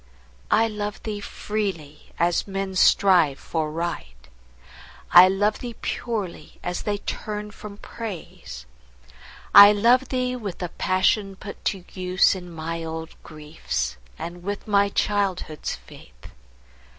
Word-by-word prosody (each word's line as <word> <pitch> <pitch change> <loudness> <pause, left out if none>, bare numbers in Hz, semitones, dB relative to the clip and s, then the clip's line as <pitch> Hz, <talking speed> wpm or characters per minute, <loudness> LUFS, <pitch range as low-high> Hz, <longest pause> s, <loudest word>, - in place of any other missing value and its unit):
I 225 +1 +4
love 210 -1 -5
thee 210 -2 -4
freely, 195 -8 -5
as 170 +3 +1
men 195 -1 -3
strive 175 -7 +4
for 155 0 -3
Right; 65 - -5 0.8
I 180 +1 +10
love 205 +3 +1
thee 240 -2 -7
purely, 205 -10 -4
as 180 0 -3
they 205 -1 -1
turn 210 +1 -5
from 205 -1 -10
Praise. 180 - -8 0.9
I 200 0 +11
love 245 +5 +3
thee 255 -1 -1
with 210 -7 -6
the 180 - -4
passion 195 +3 +1
put 200 +1 -10
to 190 -3 -2
use 185 0 +3
In 180 -2 -8
my 165 0 -5
old 160 0 -6
griefs, 150 - -4 0.2
and 175 +1 -7
with 200 +3 -5
my 200 -1 +3
childhood's 195 -7 -1
faith. - - -16
190 Hz, 125 wpm, -24 LUFS, 165-210 Hz, 0.9 s, I